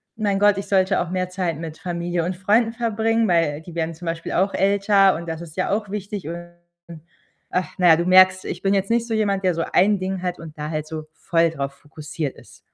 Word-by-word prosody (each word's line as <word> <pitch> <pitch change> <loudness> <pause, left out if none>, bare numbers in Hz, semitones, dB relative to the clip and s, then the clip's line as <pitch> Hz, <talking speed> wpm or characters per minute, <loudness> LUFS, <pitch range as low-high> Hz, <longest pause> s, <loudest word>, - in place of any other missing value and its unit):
„Mein 205 -3 0
Gott, 205 -1 +4
ich 195 - -5
sollte 190 -1 +2
auch 175 - -4
mehr 185 0 -1
Zeit 180 -4 -2
mit 160 -1 -7
Familie 175 -1 -2
und 180 0 -3
Freunden 220 +4 +2
verbringen“, 225 -1 0
weil 165 -4 +1
die 170 0 -12
werden 165 0 -2
zum 175 +2 -11
Beispiel 165 0 -4
auch 195 +2 +1
älter, 195 0 +3
und 170 0 -8
das 165 0 -5
ist 165 0 -11
ja 185 - 0
auch 205 -1 -1
wichtig. 200 -4 -5
Und 175 0 -7 1.0
ach, 180 -3 -2
na 180 -2 +4
ja, 160 - +8
du 170 - -1
merkst, 185 0 +6
ich 175 - -5
bin 195 0 +1
jetzt 195 +1 0
nicht 235 0 +2
so 225 - -3
jemand, 200 -3 0
der 180 -2 +2
so 165 - -1
1 200 +1 +4
Ding 185 0 -3
hat 180 -1 -3
und 155 -2 -11
da 150 +1 -4
halt 155 -1 -3
so 155 -1 -6
voll 165 -2 +1
drauf 140 -3 -4
fokussiert 150 0 -6
ist. - - -17
185 Hz, 235 wpm, -22 LUFS, 165-200 Hz, 1.0 s, ja